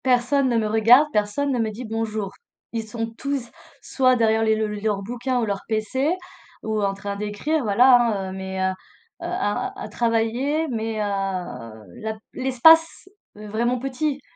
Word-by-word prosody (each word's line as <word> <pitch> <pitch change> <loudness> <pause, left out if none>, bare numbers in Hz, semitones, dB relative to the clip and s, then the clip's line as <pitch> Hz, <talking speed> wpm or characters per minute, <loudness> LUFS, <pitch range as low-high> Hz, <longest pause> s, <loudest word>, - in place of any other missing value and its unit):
Personne 260 +2 +2
ne 235 - +2
me 220 -1 +1
regarde, 230 +7 +6
personne 210 +8 0
ne 250 - 0
me 225 -1 0
dit: 235 +4 -7
«Bonjour». 220 -3 -3 0.4
Ils 225 -1 -3
sont 225 +1 -4
tous 275 -3 -3 0.3
soit 255 -1 +2
derrière 225 -1 +2
les 220 0 +3
leur 210 -1 -2
bouquin 245 +4 -2
ou - - +1
leur 200 -2 -2
pc 260 - 0 0.5
ou 220 -1 -1
en 200 -1 +1
train 200 +1 -5
d'écrire, 210 +10 -1
voilà, 245 +4 +6
hein, 205 -6 0
heu - - -7
mais 190 0 -5
heu, 190 - -1 0.5
à 345 - -2
à - - -5
travailler 235 +8 0
mais 225 -2 -3
heu, - - +1 1.0
la 220 0 -3 0.2
l'espace 320 +8 +4 0.3
vraiment 220 +4 -1
petit 270 +3 -2
225 Hz, 160 wpm, -23 LUFS, 215-260 Hz, 1.0 s, regarde